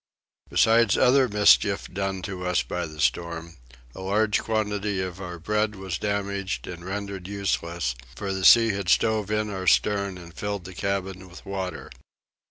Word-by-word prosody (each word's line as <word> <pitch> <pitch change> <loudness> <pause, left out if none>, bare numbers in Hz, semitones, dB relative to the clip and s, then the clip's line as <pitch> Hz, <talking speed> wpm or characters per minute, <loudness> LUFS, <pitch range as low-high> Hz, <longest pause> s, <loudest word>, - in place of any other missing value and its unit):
Besides 115 -2 +4
other 130 +1 +5
mischief 105 -1 +4
done 95 0 -3
to 95 -1 -5
us 90 -7 +1
by - - -3
the 75 0 -12
storm, 85 +1 -1 0.4
a - - -9
large 105 +3 +1
quantity 105 -2 -1
of 95 0 -4
our 90 -2 -6
bread 105 +5 -1
was 95 -2 -5
damaged 100 -1 -2
and 85 -1 -8
rendered 100 -1 -5
useless, 85 -8 -2 0.2
for 100 +1 -3
the 95 0 -3
sea 115 +3 +8
had 100 -3 -2
stove 110 -2 +2
in 105 0 -1
our 95 -1 -5
stern 100 -2 +2
and 85 -1 -12
filled 100 +2 -4
the 95 - -8
cabin 95 0 -3
with 85 - -13
water. 95 -3 -5
95 Hz, 165 wpm, -25 LUFS, 90-105 Hz, 0.4 s, sea